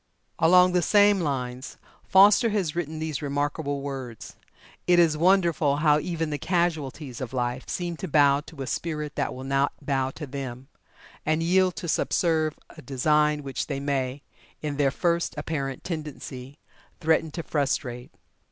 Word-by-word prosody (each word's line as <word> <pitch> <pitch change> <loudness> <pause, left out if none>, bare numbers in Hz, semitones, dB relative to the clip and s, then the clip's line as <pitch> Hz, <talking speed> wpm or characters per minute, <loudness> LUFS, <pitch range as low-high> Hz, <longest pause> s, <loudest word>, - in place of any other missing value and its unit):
Along 180 +2 +6
the 180 0 +2
same 205 +2 +4
lines, 130 -4 -3 0.3
Foster 200 +4 +6
has 195 -8 -1
written 160 -2 -3
these 155 -2 -3
remarkable 145 0 -2
words: 130 -5 -7 0.5
"It 175 -1 +5
is 165 -3 +4
wonderful 170 -4 +3
how 150 0 +4
even 165 0 -3
the 145 - -3
casualties 155 -7 -2
of 130 0 -5
life 125 0 -2
seem 175 -2 -3
to - - -5
bow 145 -2 +4
to 150 -3 -7
a - - -5
spirit 150 +1 -3
that - - -1
will 130 - -7
not 135 +1 +1
bow 135 -2 -1
to 155 - -6
them, 130 -2 -7 0.5
and 155 +1 0
yield 185 +1 +3
to 175 - -6
subserve 160 -1 +1
a 155 - -13
design 150 +2 +1
which 135 -3 -4
they 140 -2 -3
may, 140 -1 -2 0.4
in 150 -2 -4
their 140 -2 +3
first 170 +4 0
apparent 140 -3 -3
tendency, 145 -5 -7 0.4
threaten 160 0 +2
to 165 - -4
frustrate. 130 -5 -2
150 Hz, 155 wpm, -26 LUFS, 135-165 Hz, 0.5 s, Along